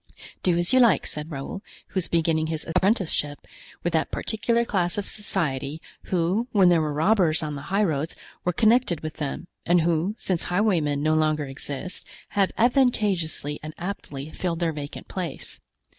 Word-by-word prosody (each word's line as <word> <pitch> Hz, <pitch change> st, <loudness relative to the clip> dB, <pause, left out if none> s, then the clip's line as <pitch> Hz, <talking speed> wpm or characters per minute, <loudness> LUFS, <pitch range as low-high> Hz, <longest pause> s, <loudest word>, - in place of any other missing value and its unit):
"Do 175 Hz, -2 st, +2 dB
as 175 Hz, +7 st, +1 dB
you 260 Hz, -, +6 dB
like," 230 Hz, -, +5 dB
said 150 Hz, +1 st, -3 dB
Raoul, 145 Hz, +6 st, -5 dB, 0.3 s
who -, -, -26 dB
was 185 Hz, -3 st, +1 dB
beginning 160 Hz, -1 st, +1 dB
his 160 Hz, -1 st, -2 dB
apprenticeship 165 Hz, -5 st, +1 dB, 0.4 s
with 175 Hz, -, 0 dB
that 160 Hz, -1 st, +1 dB
particular 235 Hz, +2 st, 0 dB
class 180 Hz, -5 st, 0 dB
of 205 Hz, -, -1 dB
society, 155 Hz, -8 st, -2 dB, 0.3 s
who, 185 Hz, +6 st, +1 dB
when 195 Hz, -4 st, +5 dB
there 170 Hz, -2 st, +4 dB
were 155 Hz, -1 st, -1 dB
robbers 165 Hz, +1 st, +3 dB
on 150 Hz, -1 st, -3 dB
the 140 Hz, -, -5 dB
highroads, 165 Hz, -6 st, +1 dB, 0.3 s
were 180 Hz, -, +1 dB
connected 220 Hz, -3 st, +3 dB
with 155 Hz, -1 st, -6 dB
them, 150 Hz, +3 st, -3 dB, 0.2 s
and 175 Hz, 0 st, +4 dB
who, 170 Hz, +5 st, +1 dB
since 185 Hz, -7 st, -1 dB
highwaymen 175 Hz, -7 st, +1 dB
no 155 Hz, +1 st, +3 dB
longer 155 Hz, -1 st, +2 dB
exist, 140 Hz, +5 st, -5 dB, 0.3 s
have 200 Hz, -2 st, +2 dB
advantageously 210 Hz, -, +2 dB
and 155 Hz, 0 st, -7 dB
aptly 155 Hz, -6 st, -5 dB
filled 170 Hz, -1 st, -2 dB
their 165 Hz, -1 st, 0 dB
vacant 145 Hz, -1 st, -7 dB
place. 175 Hz, -6 st, -5 dB
170 Hz, 165 wpm, -25 LUFS, 155-195 Hz, 0.4 s, you